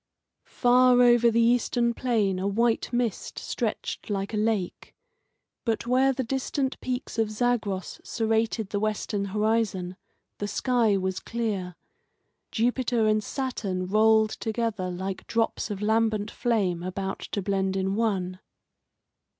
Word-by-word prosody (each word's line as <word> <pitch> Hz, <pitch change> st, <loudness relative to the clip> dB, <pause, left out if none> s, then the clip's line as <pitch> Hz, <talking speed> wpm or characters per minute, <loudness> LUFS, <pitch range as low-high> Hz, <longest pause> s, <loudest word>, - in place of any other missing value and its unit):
Far 250 Hz, 0 st, +4 dB
over 240 Hz, -1 st, +6 dB
the 230 Hz, 0 st, +2 dB
eastern 235 Hz, 0 st, +2 dB
plain 215 Hz, -7 st, 0 dB
a 190 Hz, -, -1 dB
white 230 Hz, +4 st, +1 dB
mist 240 Hz, -4 st, -2 dB
stretched -, -, -3 dB
like 200 Hz, +1 st, -2 dB
a -, -, 0 dB
lake. 210 Hz, -4 st, -2 dB, 0.7 s
But 225 Hz, -2 st, -1 dB
where 260 Hz, +2 st, +3 dB
the 265 Hz, 0 st, -2 dB
distant 265 Hz, +2 st, -2 dB
peaks 250 Hz, -2 st, -4 dB
of 220 Hz, -1 st, +2 dB
Zagros 215 Hz, -4 st, -1 dB
serrated 225 Hz, -1 st, 0 dB
the 205 Hz, -, 0 dB
western 210 Hz, -1 st, -1 dB
horizon 210 Hz, -3 st, 0 dB, 0.4 s
the 205 Hz, -, -2 dB
sky 230 Hz, -3 st, +2 dB
was 190 Hz, 0 st, -2 dB
clear. 205 Hz, -6 st, -3 dB, 0.8 s
Jupiter 240 Hz, 0 st, +1 dB
and 215 Hz, 0 st, +2 dB
Saturn 210 Hz, -10 st, -3 dB
rolled 215 Hz, +2 st, +4 dB
together 220 Hz, -4 st, -2 dB
like 190 Hz, +1 st, -5 dB
drops 230 Hz, 0 st, 0 dB
of 205 Hz, -1 st, -4 dB
lambent 220 Hz, -1 st, +1 dB
flame 200 Hz, -8 st, 0 dB
about 190 Hz, +2 st, -4 dB
to 200 Hz, -, -4 dB
blend 190 Hz, -1 st, 0 dB
in 190 Hz, 0 st, 0 dB
one. 190 Hz, -4 st, -1 dB
220 Hz, 130 wpm, -26 LUFS, 195-235 Hz, 0.8 s, over